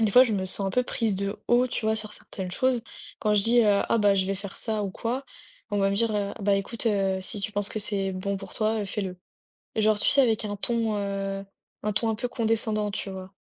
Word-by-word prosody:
des 220 -2 +3
fois 250 - +9
je 225 - -1
me 190 -2 0
sens 195 +1 0
un 195 - 0
peu 250 - +2
prise 225 -4 0
de 200 +1 -3
haut, 245 +1 +4
tu 230 - -2
vois, 220 - +3
sur 215 -1 -3
certaines 190 -3 -5
choses. 255 +3 +1 0.4
Quand 210 -1 +2
je 205 - +4
dis, 240 +1 +5
heu: 205 -2 +4
«Ah 230 - +3
bah, 205 -2 +4
je 190 -1 +2
vais 195 - 0
faire 200 0 -6
ça 220 -2 -1
ou 195 - -3
quoi», 245 +7 -3 0.5
on 205 - 0
va 195 0 +3
me - - 0
dire, 230 0 +4
heu: 200 -1 -1
«Bah, 200 0 +3
écoute, 225 +4 -4
heu, 195 -3 +1
si 205 +3 -1
tu 210 +2 -2
penses 205 0 +1
que 215 - -4
c'est 195 -2 0
bon 195 +2 -2
pour 195 0 -9
toi, 220 0 +1
heu, 205 - -2
fais-le». 190 -2 -4 0.6
Genre, 215 -1 +3
tu - - +4
sais, - - +5
avec 225 -5 +2
un 205 - -3
ton, 225 0 0
heu, 195 -1 -3 0.4
un 210 - 0
ton 225 +2 +1
un 220 - 0
peu 245 - -3
condescendant, 220 -2 0
tu 200 -1 -4
vois? 190 0 -8
210 Hz, 265 wpm, -26 LUFS, 195-225 Hz, 0.6 s, fois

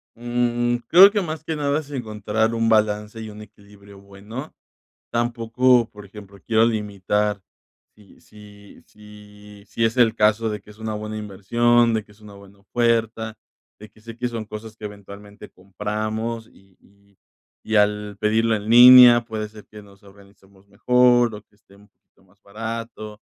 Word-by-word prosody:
Mm, 120 0 -1
creo 190 +4 +8
que 205 - -1
más 155 -3 -6
que 160 0 -4
nada 145 0 -1
es 145 -2 -11
encontrar 110 -3 -2
un 115 0 0
balance 105 0 0
y 110 - -8
un 105 0 -11
equilibrio 100 -1 -17
bueno. 100 +8 -10 0.6
Tampoco, 120 +1 +1
por 105 -1 -14
ejemplo, 100 0 -14
quiero 110 0 +3
limitar 105 -2 -2 0.5
si 105 -2 -21
si 105 -1 -17
si 105 -1 -16
si 115 - -3
es 115 +2 0
el 115 -2 +3
caso 110 +1 +1
de 105 -1 -5
que 105 - -21
es 105 - -15
una 110 -1 -5
buena 105 0 -6
inversión, 115 +4 +1
de 110 - -1
que 105 - -21
es 105 - -26
una 105 -1 -14
buena 100 0 -17
oferta, 115 0 -1 0.4
de 105 +1 -13
que - - -24
sé 115 +1 -12
que 125 0 -3
son 115 -2 -6
cosas 110 +1 -10
que 110 - -9
eventualmente 100 0 -12
compramos 110 +4 -5
y 95 -1 -25
y 100 0 -29 0.5
y 110 - -3
al 105 -1 0
pedirlo 110 +1 +1
en 105 +1 -6
línea, 120 0 +9
puede 110 -2 -5
ser 105 -1 -15
que 105 -1 -13
nos 100 -1 -20
organicemos 100 0 -21
mejor 120 +2 +2
o 105 - -11
que 105 - -34
esté 100 -1 -24
un 100 +1 -22
poquito 95 - -35
más 95 +2 -30
barato. 110 0 -8
105 Hz, 170 wpm, -21 LUFS, 105-115 Hz, 0.6 s, línea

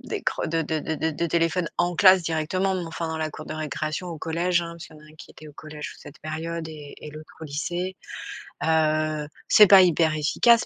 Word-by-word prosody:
d'écran - - -3
de 165 +1 0
de 160 0 -2
de 160 - -3
de 160 +2 0
de 170 +3 -2
téléphone 165 +1 +1
en 175 0 +1
classe, 185 -2 +7
directement. 165 +4 0
Mais, 180 -2 -3
enfin, 165 0 -4
dans 160 - -3
la 155 -1 -2
cour 155 - -9
de - - -5
récréation 155 +3 -3
au 165 -2 -6
collège, 175 +3 0
hein. 170 0 -6
Parce 170 -1 -10
qu'il 155 - -16
y - - -14
en - - -17
a 155 - -16
un 155 - -17
qui - - -13
était 155 - -13
au - - -13
collège 155 -1 -8
sur - - -14
cette 145 - -13
période 160 +1 -5
et 150 -2 -10
et 150 - -9
l'autre 155 +1 -11
au 160 - -6
lycée. 175 +6 -3 0.7
Heu, 155 -1 +1 0.2
c'est 210 -2 +8
pas 195 -1 +9
hyper 165 -3 +3
efficace, 230 +10 +4
160 Hz, 240 wpm, -25 LUFS, 155-175 Hz, 0.7 s, pas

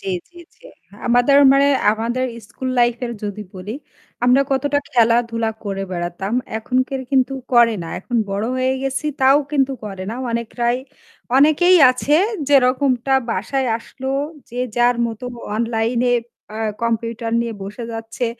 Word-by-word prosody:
জ্বী, 195 - -4 0.2
জ্বী, 345 0 -15 0.2
জ্বী। - - -15 0.4
আমাদের 245 +3 +4 0.2
মানে 275 +1 +4 0.3
আমাদের 235 +4 -2 0.2
স্কুল 260 - -6
লাইফ 240 -1 +4
এর 235 - -5
যদি 210 0 -4
বলি, 195 +5 -6 0.5
আমরা 255 +3 +5
কতটা 285 +2 +1
খেলাধুলা 230 -1 +2
করে 195 -1 -3
বেড়াতাম। 175 +3 -4 0.3
এখনকার 255 +3 -1
কিন্তু 265 0 +2 0.2
করে 235 -2 +5
না। 165 - -7
এখন 240 +5 -3
বড় 200 +2 -1
হয়ে 260 +1 +1
গেছি 270 +3 -2
তাও 270 +2 +6
কিন্তু 275 -2 +2
করে 195 -3 -6
না। - - -4 0.2
অনেকরাই 235 +1 -1 0.6
অনেকেই 310 +6 +5
আছে 255 +3 0 0.3
যেরকমটা 265 -1 +3 0.2
বাসায় 255 +7 -1
আসলো 265 +3 -8 0.4
যে 245 - -7 0.2
যার 240 0 +3
মতো 225 +1 -7 0.3
অনলাইনে 235 +2 0 0.4
আ - - -5 0.2
কম্পিউটার 230 0 -2
নিয়ে 235 -1 -3
বসে 210 +4 -7
যাচ্ছে। 225 +2 -4
240 Hz, 140 wpm, -20 LUFS, 225-265 Hz, 0.6 s, তাও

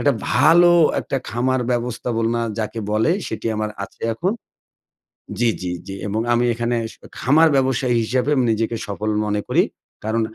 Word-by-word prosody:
একটা 145 - +3 0.2
ভালো 175 +2 +6 0.3
একটা - - -3
খামার 130 +2 0
ব্যবস্থাপনা 120 -1 -1 0.2
যাকে 110 +1 -3
বলে 110 +8 +2 0.2
সেটি 110 +1 -5
আমার 110 0 -2
আছে - - -17
এখন 180 - 0 1.1
জি, 120 -1 +3
জি, 90 -1 -3 0.2
জি 95 - -6
এবং 110 +3 -1
আমি 120 +1 +2
এখানে 120 +1 -1 0.2
শ - - -19 0.2
খামার 155 +5 +5
ব্যবসায়ী 130 -2 +1
হিসাবে 125 +4 0
আমি 130 -2 +2
নিজেকে 115 +1 -1
সফল 105 +2 -3 0.2
মনে 105 0 -1
করি। - - +3 0.4
কারণ 110 +1 0
120 Hz, 155 wpm, -21 LUFS, 110-130 Hz, 1.1 s, ভালো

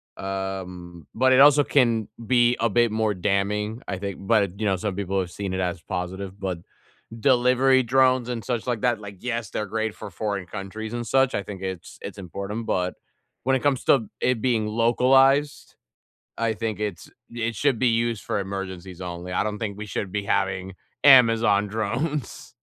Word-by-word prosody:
Um, 95 -3 -6
but 130 +2 +3
it 130 - +5
also 145 +1 +7
can 120 -7 +2 0.2
be 120 +1 +3
a 115 - +2
bit 120 +2 +3
more 110 -1 +1
damning, 105 +4 -1
I 95 - -3
think, 100 -2 -4
but, 100 -3 +1
you 110 - -1
know, 100 -2 +2
some 95 +1 -3
people 100 0 -1
have 90 -2 -2
seen 95 +1 -5
it 95 - -2
as 90 -2 -2
positive. 95 +2 -5
But 95 -3 -3 0.6
delivery 130 +1 +4
drones 130 0 +3
and 120 -2 -3
such 120 -2 -2
like 120 -3 -1
that, 120 -2 +2
like, 100 -1 -9
yes, 120 -4 -3
they're 105 - -3
great 110 +1 -2
for 100 - -9
foreign 100 0 -3
countries 105 +4 -6
and 120 -1 -4
such, 135 +3 +2
I 100 - 0
think 100 -1 -8
it's 95 -3 -6
it's - - -7
important, 100 +4 -5
but 90 0 -1 0.5
when 130 +1 +2
it 130 - -1
comes 140 -3 +1
to 115 -6 +3
it 125 -3 +1
being 115 -3 +1
localized, 135 +6 +3 0.6
I 115 -1 0
think 110 -2 -4
it's 105 -4 -4 0.2
it 115 0 -3
should 135 +1 +1
be 130 - +3
used 115 -1 0
for - - -2
emergencies 95 -2 -6
only. 90 0 -6
I 90 - +1
don't 105 0 -3
think 105 -2 -4
we 105 - -6
should 100 -1 -4
be 105 -1 -2
having 95 -1 -1 0.3
Amazon 115 -6 +6
drones. 120 +8 -3
105 Hz, 185 wpm, -24 LUFS, 95-120 Hz, 0.6 s, also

